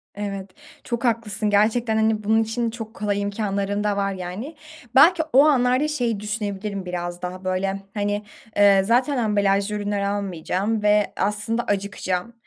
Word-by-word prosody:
Evet. 195 -1 -5 0.3
Çok 235 0 -3
haklısın. 220 -2 0
Gerçekten, 220 +3 +2
hani, 220 -1 +1
bunun 220 +2 +3
için 230 +1 -2
çok 225 -1 -8
kolay 205 -1 -1
imkânların 200 0 -2
da 205 -1 0
var 200 0 0
yani. 190 - -6 0.4
Belki 325 +5 +6
o 275 +3 +7
anlarda 260 0 +3
şeyi 240 -8 -1
düşünebilirim 205 -2 -4
biraz 175 -1 -4
daha, 180 +1 -6
böyle, 195 +1 -1
hani, 205 0 -1 0.4
ııı, 200 -1 +6
zaten 250 +5 +2
ambalajlı 205 -2 +1
ürünler 205 -1 -2
almayacağım 200 +1 -2
ve 210 -1 +3
aslında 210 +4 0
acıkacağım 200 0 -2
205 Hz, 145 wpm, -23 LUFS, 195-225 Hz, 0.4 s, o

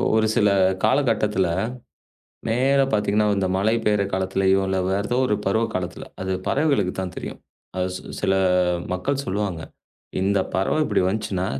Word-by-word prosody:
ஒரு 110 0 +3
சில 105 -4 +4 0.3
காலகட்டத்துல, 110 -6 +2 1.0
நேரா 135 +4 +3
பாத்தீங்கன்னா 105 0 +2
இந்த 95 -1 0
மழை 105 +4 +2
பெய்யற 105 -1 +2
காலத்துலயோ 95 +1 +2
இல்ல 95 0 0
வேறதோ 100 +5 0
ஒரு 105 - +1
பருவ 110 +4 +2
காலத்துல 90 -1 -4 0.2
அது 95 0 -2 0.2
பறவைகளுக்கு 140 -11 +1
தான் 90 -1 -5
தெரியும். - - -7 0.4
அது 90 0 0
சி - - -8 0.2
சில 95 -1 +1 0.6
மக்கள் 135 +10 -1
சொல்லுவாங்க. 95 -4 -2 0.6
இந்தப் 100 0 +1
பறவை 95 +10 +1
இப்படி 105 -8 +1
வந்துச்சுன்னா 95 -2 -1
100 Hz, 140 wpm, -23 LUFS, 95-110 Hz, 1.0 s, சில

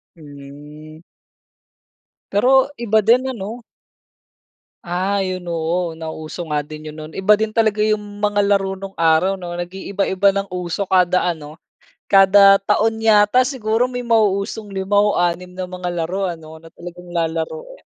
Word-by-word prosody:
Hmm. 150 +1 -13 1.3
Pero 260 +6 +4
iba 220 -3 +1
din 235 +5 +3
ano? 230 +1 -7 1.2
Ah 185 +3 -1
'yon 185 -2 -5
oo 165 0 -2
nauso 160 +1 -7
nga 150 -1 0
din 155 +1 -11
'yon 155 0 -9
no'n. 155 +1 -10
Iba 195 +2 +4
din 220 +1 0
talaga 215 -1 +1
'yong 210 -1 -2
mga 205 0 +1
laro 195 -1 0
nong 195 0 -8
araw 165 +3 +2
'no, 175 -1 -7
nag-iiba-iba 190 +2 -1
ng 200 0 -2
uso 180 +2 -3
kada 180 -1 +2
ano, 155 -3 -4 0.5
kada 195 0 +7
taon 220 +2 +1
yata 220 +3 +4
siguro 240 -3 0
may 245 -1 -5
mauusong 215 -2 0
5 195 +1 -1
o 205 0 +3
6 175 +1 -1
na 185 0 -6
mga 180 -1 -5
laro 175 +3 -2
ano 160 -3 -7
na 165 +1 -16
talagang 175 0 -11
lalaruin. 170 - -4
190 Hz, 145 wpm, -19 LUFS, 170-210 Hz, 1.3 s, kada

